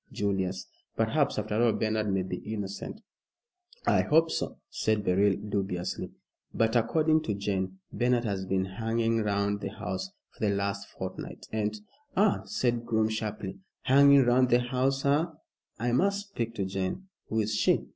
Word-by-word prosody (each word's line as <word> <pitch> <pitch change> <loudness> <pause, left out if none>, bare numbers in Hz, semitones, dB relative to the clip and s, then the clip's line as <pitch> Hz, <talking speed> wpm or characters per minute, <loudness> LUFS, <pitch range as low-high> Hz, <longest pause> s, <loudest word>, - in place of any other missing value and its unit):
Julius, 95 -2 -1 0.3
perhaps 140 +6 +1
after 105 +1 0
all 120 -2 +4
Bernard 110 -1 0
may 95 -1 +1
be 90 -1 -4
innocent." 105 - -5 0.8
"I - - +4
hope 160 +1 +3
so," - - -2
said 110 -1 0
Beryl, 100 +1 +3
dubiously; 100 -3 -3 0.5
"but 115 +1 +2
according 155 +7 +3
to 105 -8 -2
Jane, 95 -2 -2 0.2
Bernard 120 -1 +2
has 95 -3 -2
been 95 0 +1
hanging 115 +3 0
round 100 -1 0
the - - -3
house 95 -2 -4 0.2
for - - -25
the 100 -1 +2
last 100 0 -2
fortnight, - - -7
and 105 -1 -1 0.2
" 290 -1 -36
"Ah!" 205 0 +4
said 120 - 0
Groom, 110 -2 +1
sharply, 105 -3 -4 0.2
"hanging 140 +1 +7
round 125 +1 +4
the 120 0 +4
house, 130 +2 0
eh? 145 +4 +4 0.5
I 120 +2 0
must 200 +9 +1
speak 115 - -3
to 100 - -1
Jane. 95 - -3 0.2
Who 110 - 0
is 110 0 0
she?" 105 - +2
110 Hz, 160 wpm, -29 LUFS, 100-125 Hz, 0.8 s, hanging